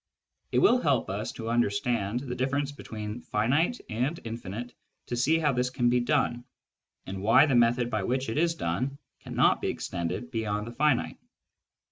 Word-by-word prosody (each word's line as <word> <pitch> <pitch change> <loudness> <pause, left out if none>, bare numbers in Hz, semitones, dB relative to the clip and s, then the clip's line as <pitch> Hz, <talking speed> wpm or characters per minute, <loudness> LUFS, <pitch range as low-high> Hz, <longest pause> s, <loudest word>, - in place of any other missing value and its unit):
It - - +1
will 250 -10 +5
help 135 -9 +1
us 100 +2 -3
to 115 0 -4
understand 115 0 0
the 130 -3 -5
difference 135 +3 -1
between 110 -4 -7
finite 140 - +1
and 125 +9 -1
infinite 115 +1 -6 0.3
to 120 - -3
see 135 +7 +3
how 150 -3 +2
this 125 0 0
can 125 -1 +1
be 125 - +3
done, 120 -2 +1 0.6
and 95 0 -6
why 115 +7 +6
the 140 - 0
method 120 0 +3
by 110 -2 0
which 130 +7 -1
it 110 +6 -1
is 165 0 +2
done 125 - -2 0.2
cannot - - +2
be - - -1
extended 85 +9 -3
beyond 105 -3 -2
the 115 - -7
finite. 145 0 +1
120 Hz, 170 wpm, -28 LUFS, 110-135 Hz, 0.6 s, why